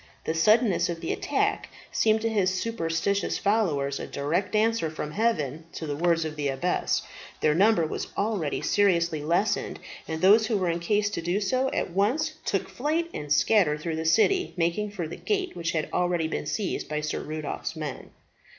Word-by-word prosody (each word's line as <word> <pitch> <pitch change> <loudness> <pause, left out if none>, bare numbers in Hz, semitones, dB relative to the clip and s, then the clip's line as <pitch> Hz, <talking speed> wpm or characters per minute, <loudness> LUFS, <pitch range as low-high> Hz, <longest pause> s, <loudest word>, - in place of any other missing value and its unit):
The 160 - -1
suddenness 210 +5 +3
of 170 -1 -3
the - - -2
attack - - -1 0.2
seemed 220 0 +2
to 225 - 0
his 200 -4 +2
superstitious 200 -2 -1
followers 160 -10 +1
a - - -5
direct 170 +9 -1
answer 220 -5 +2
from 150 -1 -5
heaven 160 - -1
to 160 - -5
the 145 -2 -3
words 165 +1 +2
of 155 -1 -4
the 145 -2 -2
abbess. 140 +7 0 0.4
Their 150 - +3
number 195 0 +4
was 155 - -4
already 200 -8 -1
seriously 170 -6 +2
lessened, 185 +7 0 0.3
and 160 0 -3
those 210 +5 +6
who 220 - +1
were 180 -3 +1
in 170 - -2
case 205 +4 +1
to 170 - -3
do 175 +4 0
so 255 +6 +1
at - - -2
once 220 - +1
took - - 0
flight 320 +5 -1
and 150 -1 -6
scattered 150 -2 +3
through 160 0 -3
the 160 - -3
city, 365 - +3
making 170 +5 0
for 185 -6 -4
the 160 - -7
gate, 390 -3 -2
which 170 -1 -2
had 155 -2 -1
already 175 -2 +1
been 155 - -4
seized 200 -6 -2
by 150 0 -2
Sir 155 - -2
Rudolph's 155 +1 -5
men. 150 -4 -6
175 Hz, 185 wpm, -26 LUFS, 160-215 Hz, 0.4 s, those